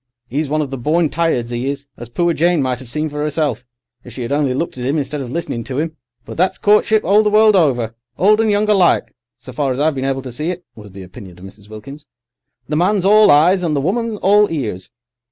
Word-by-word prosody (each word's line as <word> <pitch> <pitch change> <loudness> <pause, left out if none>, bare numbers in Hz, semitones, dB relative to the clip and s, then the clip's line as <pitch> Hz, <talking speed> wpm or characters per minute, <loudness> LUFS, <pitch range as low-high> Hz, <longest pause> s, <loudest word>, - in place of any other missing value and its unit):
'E's 145 +2 -2
one 155 +1 0
of 140 - -7
the 135 - -5
born 155 +5 +1
tireds, 140 -7 -1
'e 120 +3 -2
is, 140 0 -6
as 120 -1 -10
poor 170 +7 0
Jane 170 +1 +1
might 130 -2 -1
'ave - - -10
seen 150 +6 -3
for 150 0 -4
'erself, 150 -4 -2 0.4
if 120 - -12
she 125 - -6
'ad 120 - -5
only 140 -3 0
looked 165 +5 -3
at - - -5
'im, 140 +4 0
instead 145 0 -3
of 125 - -6
listening 130 -5 -4
to 135 +1 -4
'im. 160 0 -3 0.3
"But - - -9
that's 185 +3 +1
courtship 210 +1 +3
all 205 +2 +4
the 210 - +1
world 215 0 +5
over—old 130 - +1
and 225 - +1
young 205 +1 +1
alike, 195 -5 +2 0.2
so 130 - -12
far 135 +1 -1
as 130 - -3
I've 155 +2 +2
been 135 -1 -4
able 135 -1 -2
to 130 - -7
see 150 +7 -4
it," 180 0 -6
was 105 -3 -13
the 95 -1 -9
opinion 90 0 -12
of 90 - -12
Mrs. 100 +2 -15
Wilkins. 135 +8 -11 0.6
"The 150 - -2
man's 190 +2 +1
all 210 +2 +6
eyes 170 +6 +4
and 165 -4 -1
the - - +1
woman 215 - -2
all 205 +1 +3
ears. 110 - -4
150 Hz, 245 wpm, -17 LUFS, 125-180 Hz, 0.6 s, all